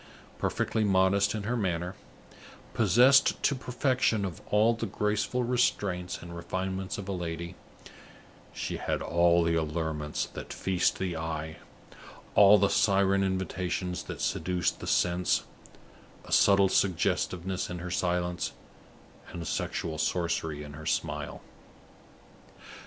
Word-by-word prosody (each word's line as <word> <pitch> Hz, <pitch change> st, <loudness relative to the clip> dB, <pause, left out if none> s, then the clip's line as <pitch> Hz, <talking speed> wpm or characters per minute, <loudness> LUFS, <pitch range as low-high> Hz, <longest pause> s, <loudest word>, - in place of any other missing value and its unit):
Perfectly 110 Hz, -, 0 dB
modest 100 Hz, +1 st, +3 dB
in 105 Hz, -, -4 dB
her 120 Hz, +5 st, -1 dB
manner, 90 Hz, -4 st, -1 dB, 0.8 s
possessed 135 Hz, +4 st, +4 dB
to -, -, +3 dB
perfection 125 Hz, -4 st, 0 dB
of 90 Hz, -5 st, -5 dB, 0.4 s
the 115 Hz, -, -2 dB
graceful 105 Hz, +5 st, 0 dB
restraints 95 Hz, -8 st, 0 dB
and 85 Hz, 0 st, -9 dB
refinements 95 Hz, +2 st, -4 dB
of 100 Hz, -1 st, -7 dB
a -, -, -3 dB
lady, 85 Hz, -1 st, -4 dB, 1.0 s
she -, -, -4 dB
had -, -, -2 dB
all 85 Hz, 0 st, +3 dB
the 85 Hz, 0 st, +1 dB
allurements 80 Hz, -2 st, -2 dB
that -, -, -8 dB
feast 95 Hz, -2 st, 0 dB
the 90 Hz, -3 st, -2 dB
eye, 80 Hz, -1 st, -4 dB, 0.8 s
all 100 Hz, +1 st, +8 dB
the 100 Hz, 0 st, +3 dB
siren 100 Hz, -1 st, +3 dB
invitations 95 Hz, -1 st, -2 dB
that -, -, -7 dB
seduce 90 Hz, 0 st, 0 dB
the -, -, -10 dB
sense 90 Hz, 0 st, +1 dB, 0.8 s
a -, -, -12 dB
subtle 100 Hz, -1 st, +5 dB
suggestiveness 90 Hz, 0 st, 0 dB
in 90 Hz, -, -5 dB
her 90 Hz, +1 st, -6 dB
silence, 90 Hz, -1 st, -1 dB, 0.8 s
and 85 Hz, -, -6 dB
a -, -, -8 dB
sexual 80 Hz, +1 st, -3 dB
sorcery 80 Hz, -3 st, -1 dB
in 75 Hz, -1 st, -10 dB
her 75 Hz, +2 st, -8 dB
smile. -, -, -2 dB
90 Hz, 125 wpm, -29 LUFS, 85-100 Hz, 1.0 s, all